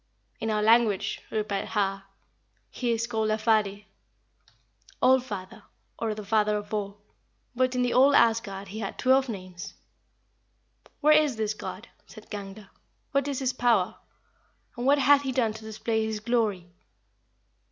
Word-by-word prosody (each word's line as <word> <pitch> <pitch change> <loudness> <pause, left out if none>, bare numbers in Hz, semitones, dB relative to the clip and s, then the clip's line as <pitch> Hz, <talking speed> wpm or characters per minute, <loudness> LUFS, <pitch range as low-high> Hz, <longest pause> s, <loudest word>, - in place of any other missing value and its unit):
"In 225 - -2
our 210 -1 0
language," 220 -3 +3
replied 210 -2 -2
Har, 195 -2 -1 0.7
"he 245 -2 -2
is 230 0 0
called 220 -2 -1
Alfadir 215 -2 +1 1.1
(All 260 0 +5
Father, 205 -7 -8 0.4
or 220 -2 -2
the 210 -1 -8
Father 210 0 +2
of 205 0 -8
all); 205 -1 -3 0.6
but 255 +1 +1
in 250 - +1
the 245 - 0
old 275 +3 +5
Asgard 205 -4 +2
he 215 +3 -7
had 195 -3 -5
twelve 265 0 +3
names." 185 -2 -8 1.3
"Where 305 +1 +6
is 300 -4 +3
this 215 -1 -1
God?" - - -8 0.2
said - - -14
Gangler; 200 -1 -8 0.4
"what 275 0 +1
is 280 -2 -2
his 260 -1 -1
power? 230 -6 +2 0.8
and 245 +2 -3
what 285 +1 +5
hath 280 +1 +5
he 270 -2 -3
done 240 -4 +1
to 220 0 -11
display 220 +1 -2
his 220 -1 -3
glory?" 215 -6 -1
220 Hz, 150 wpm, -27 LUFS, 205-245 Hz, 1.3 s, Where